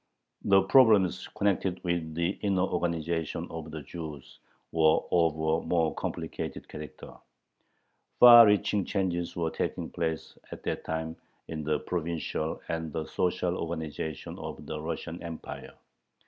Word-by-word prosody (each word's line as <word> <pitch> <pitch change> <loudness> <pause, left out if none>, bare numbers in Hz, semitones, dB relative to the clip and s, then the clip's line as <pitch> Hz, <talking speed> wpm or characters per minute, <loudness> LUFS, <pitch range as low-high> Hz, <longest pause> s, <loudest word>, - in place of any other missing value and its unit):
The 95 -1 +5
problems 105 -4 +5
connected 95 -2 +1
with 85 -3 -2
the 85 +1 +1
inner 95 -3 +1
organization 85 -3 -1
of 80 -1 -6
the 80 -1 -7
Jews 75 -4 -8 0.3
were 80 -1 +4
of 85 -3 +3
a 80 +1 +1
more 85 -3 +2
complicated 80 -3 -5
character. 75 0 -9 1.1
Far 120 -2 +11
reaching 105 -1 +2
changes 90 -3 -2
were 80 -2 -1
taking - - -3
place 80 -1 -3
at - - -8
that - - -3
time 80 0 -3 0.3
in 80 -1 -4
the 75 0 +1
provincial 85 -2 -3
and 80 -1 -3
the 80 +1 -3
social 90 +1 0
organization 80 -3 -5
of - - -7
the 75 -1 -5
Russian 85 +1 -5
Empire. 85 -2 -8
85 Hz, 135 wpm, -29 LUFS, 80-90 Hz, 1.1 s, Far